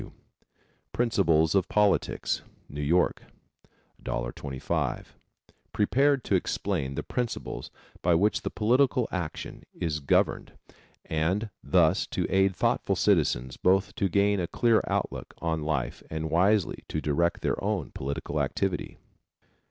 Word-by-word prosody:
W., - - -11 0.8
Principles 85 -10 +2
of 95 -2 +2
Politics. 105 -1 +1 0.3
New 75 +1 -6
York, 85 +5 +2 0.8
$1.25. 65 +2 -3 0.7
Prepared 135 +5 +2
to - - -2
explain 85 -6 -1
the - - -3
principles 125 -2 -4 0.3
by 85 0 +3
which 100 +6 +2
political 125 +2 +3
action 85 -5 -5
is 75 -3 -2
governed 70 - +1 0.5
and 90 +8 -1
thus 85 -4 +3
to - - -2
aid 95 0 +3
thoughtful - - +1
citizens 60 +1 +1
both 95 +1 +2
to 100 - 0
gain 100 +2 +2
a 85 - -1
clear 115 +2 +3
outlook - - -3
on 80 -1 -1
life 70 -5 -2
and 80 0 -4
wisely 95 +3 +2
to 75 - -2
direct 80 +3 0
their - - -1
own 100 -6 -1
political 70 +2 -3
activity. 95 -2 -2
90 Hz, 120 wpm, -27 LUFS, 80-105 Hz, 0.8 s, by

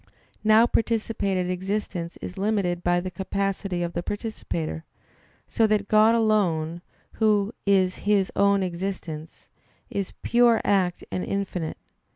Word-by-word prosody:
Now 220 +1 +6
participated 215 -6 0
existence 185 -2 -3
is - - -6
limited 195 -4 0
by 175 0 +2
the 185 +1 -5
capacity 195 -1 -2
of 170 0 -3
the 175 - -2
participator; 90 - -4 0.6
so 225 - +2
that 210 -1 +1
God 215 +2 +5
alone, 175 -7 +1 0.4
Who 210 0 +3
is 190 -2 +3
His 205 -2 +1
own 200 -1 +3
existence, 170 -3 -5 0.4
is 200 -2 -3
pure 235 -1 +4
act 185 -3 +1
and 185 - -2
infinite. 190 -5 -3
195 Hz, 125 wpm, -25 LUFS, 175-215 Hz, 0.6 s, Now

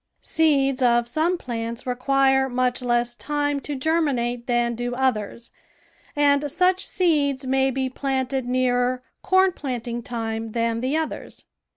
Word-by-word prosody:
Seeds 275 -4 +1
of 240 -1 +3
some 315 +8 +1
plants 230 -4 -5
require 265 +1 +2
much 250 0 0
less 240 -1 0
time 290 +1 -1
to 290 +1 -5
germinate 260 -5 0
than 240 -1 +1
do 245 +1 -3
others, 235 -3 -2 0.6
and 290 0 +3
such 365 +4 +2
seeds 290 -7 +1
may 265 +1 +2
be 265 0 -1
planted 265 -1 -2
nearer 250 0 +1 0.2
corn 375 0 +3
planting 245 -6 -4
time 225 -2 -4
than 230 -1 0
the 265 +5 0
others. 320 -1 -5
260 Hz, 135 wpm, -23 LUFS, 240-285 Hz, 0.6 s, of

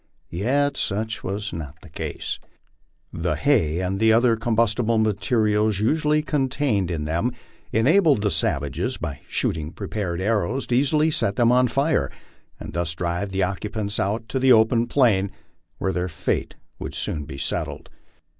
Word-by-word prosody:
Yet 135 +10 +1
such 110 +2 -2
was 100 +2 -3
not 80 -1 -7
the 90 - -13
case. 80 - -4 0.7
The 85 -1 -1
hay 90 - +2
and 95 +2 -2
other 115 +1 +5
combustible 115 0 +1
material 110 0 +2
usually 150 +9 +1
contained 130 - 0
in 80 -4 -2
them 85 +11 0 0.4
enabled 145 - +4
the 105 - +2
savages, 70 -3 -1
by 70 - -5
shooting 80 -1 -1
prepared 95 -3 -4
arrows, 110 +5 0
to 120 - 0
easily 150 +4 +3
set 100 -8 0
them 120 -1 +4
on 125 0 +4
fire, 140 +6 +1 0.5
and - - -8
thus 85 -1 -1
drive 85 +3 -2
the 95 0 0
occupants 100 +2 -2
out 110 +4 -1
to 135 - -1
the 130 0 +4
open 115 +1 +4
plain, 105 -8 +3 0.5
where 95 - -1
thcflr 90 +1 -1
fate 80 - -2 0.2
would - - -6
soon 75 -2 -3
be 70 - -8
settled. - - -3
105 Hz, 150 wpm, -23 LUFS, 90-125 Hz, 0.7 s, other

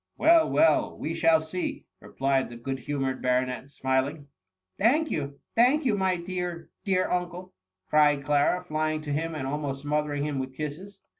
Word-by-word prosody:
" - - -47
Well, 325 0 +5
well, 320 0 +3
we 160 - -3
shall 165 -1 +4
see," 160 +3 -4
replied 135 0 -1
the 120 - -9
good 135 +3 -4
humoured 135 -1 -2
baronet, 125 +1 0
smiling. 130 +2 0
*^ 145 - -16 0.5
Thank 290 +9 +3
you, 140 -2 -3 0.2
thank 260 +6 +4
you, 225 -5 +3
my 190 -2 +1
dear, 175 -1 -5
dear 185 -2 +1
un 180 -1 0
cle 180 +1 -10 0.2
!" 95 0 -59
cried 145 -2 +4
Clara, 145 +5 +2
flying 155 0 -1
to 145 -1 -3
him, 165 +2 -2
and 140 -3 -3
almost 140 -1 -3
smo 150 +1 +1
thering 145 -1 -3
him 145 -2 -2
with 130 0 -5
kisses. 175 +7 -6
150 Hz, 190 wpm, -27 LUFS, 140-180 Hz, 0.5 s, Well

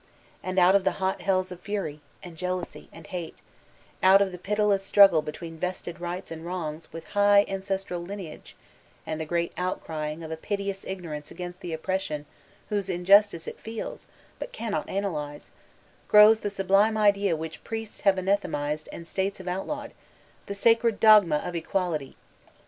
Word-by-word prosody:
And 185 0 -4
out 180 +1 +6
of 200 -1 +4
the - - +1
hot 190 -1 -2
hells 185 0 +1
of 180 - -8
Fury, 180 -7 -4 0.2
and 175 -3 -10
Jealousy, 180 +1 -4
and 165 - -13
Hate, 180 -5 -6 0.6
out 190 +1 +7
of 200 -1 +1
the 180 - -8
pitiless 205 0 +1
struggle 195 -5 +6
between 160 +2 -8
'Vested 180 -1 -4
rights*' 175 +1 -5
and 160 0 -7
wrongs 165 -3 -5
with 165 0 -8
high 205 0 +5
ancestral 195 -2 -3
lineage, 180 -3 -8 0.5
and 160 0 -4
the 160 - -4
great 170 +1 -1
outcrying 160 -3 -3
of 160 - -8
a - - -2
piteous 200 +2 -3
ignorance 160 -6 -6
against 180 +1 -8
an 175 - -5
oppression 160 -3 -2 0.4
whose 200 -2 -1
injustice 185 0 +4
it - - -7
feels 225 0 -6 0.3
but - - -6
cannot 230 - -3
analyse, 150 -7 -4 0.6
grows 210 +1 +8
the 205 - -2
sublime 200 +2 +2
idea 200 -4 +3
which 160 -1 -7
priests 225 -1 -6
have 195 -1 +4
anathematised 155 -6 -1
and 170 - -9
States 195 +2 -2
have 185 - -10
outlawed— 285 +11 -4 0.5
''the 200 - -4
sacred 230 +1 +3
dogma 210 -8 +7
of 180 - -4
Equauty." 165 -4 -2
185 Hz, 160 wpm, -27 LUFS, 165-200 Hz, 0.6 s, grows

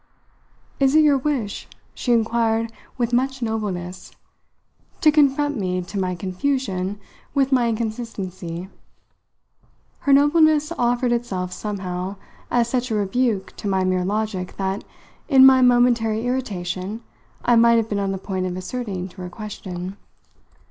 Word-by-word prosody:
"Is 270 +1 +3
it 315 - +7
your 285 -2 +4
wish," 260 -7 -2 0.3
she 245 - -2
inquired 230 0 +1 0.2
with 240 -1 -1
much 265 +1 0
nobleness, 190 -5 -4 0.9
"to 305 - +6
confront 290 -2 +2
me, 180 -2 -1
to 195 +3 -5
my 180 -1 -1
confusion, 195 0 -2 0.4
with 275 -1 +2
my 245 -3 +3
inconsistency?" 200 -6 -4 1.3
Her 280 - 0
nobleness 300 +2 +4
offered 245 -1 +1
itself 195 -7 -2
somehow 190 -2 -4 0.3
as 240 -1 +2
such 250 +1 -1
a 220 - 0
rebuke 205 0 0
to - - -5
my 190 -1 +1
mere 185 -1 +1
logic 200 -2 -2
that, 195 +1 -2 0.5
in 265 -3 +8
my 260 -1 +7
momentary 240 -3 +3
irritation, 205 -4 -3 0.4
I 240 - +5
might 235 0 +6
have 225 -1 +1
been 205 -2 -2
on 195 -1 -1
the 195 - -2
point 185 -1 -3
of 180 0 -4
assenting 190 -2 -4
to 185 - -12
her 180 - -5
question. 190 -2 -7
220 Hz, 140 wpm, -22 LUFS, 190-250 Hz, 1.3 s, in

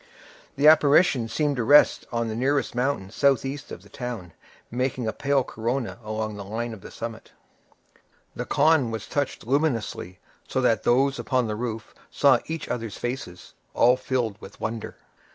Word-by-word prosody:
The 145 +2 +4
apparition 145 -4 +5
seemed 145 +4 0
to 120 - 0
rest 145 +5 +5
on 115 -1 -1
the 110 - -3
nearest 135 +3 0
mountain 125 -6 -1
southeast 140 +2 0
of - - -8
the - - -18
town, 120 - -6 0.4
making 125 0 -1
a 110 - -1
pale 140 -1 +1
corona 120 +2 -3
along 110 0 -3
the 100 - -6
line 115 +4 -4
of 105 - -10
the - - -10
summit. 115 -1 -8 1.0
The - - -4
khan 155 -6 +3
was 110 -2 -5
touched 145 -5 -3
luminously, 125 - -1 0.3
so - - -1
that - - +2
those 135 +3 +3
upon 130 -2 0
the 105 -1 -2
roof 115 -1 -5 0.2
saw 135 -4 +4
each 160 -1 -4
other's 115 -4 -4
faces, 120 -8 -6 0.2
all 125 +1 +5
filled 125 -5 -2
with - - -12
wonder. 110 0 -4
125 Hz, 165 wpm, -25 LUFS, 110-140 Hz, 1.0 s, apparition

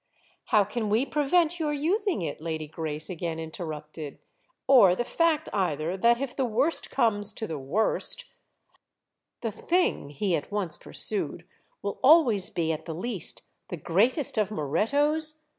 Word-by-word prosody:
"How 210 - +4
can 210 +2 -3
we 225 +6 +2
prevent 315 +4 +1
your 300 -2 0
using 350 - 0
it?" 150 -1 -5
Lady 160 -1 -3
Grace 155 0 -3
again 170 -2 -4
interrupted; 155 -2 -7 0.5
"or 235 -10 +6
the 240 - -1
fact 325 +3 +1
either 170 -3 -1
that 235 +5 +3
if 270 -2 -4
the 270 - 0
worst 255 +7 +1
comes 210 -5 +2
to 220 - -4
the 160 -7 -5
worst—" 215 - +1 1.2
"The 225 - -2
thing"—he 195 - 0
at 150 - -5
once 195 -6 -1
pursued—"will 195 +1 -4
always 255 - +5
be 165 -2 -1
at 155 - -5
the 160 - -5
least 205 +1 -2 0.2
the 175 - -5
greatest 220 - +1
of 210 -2 +1
Morettos? 290 - 0
210 Hz, 140 wpm, -27 LUFS, -, 1.2 s, or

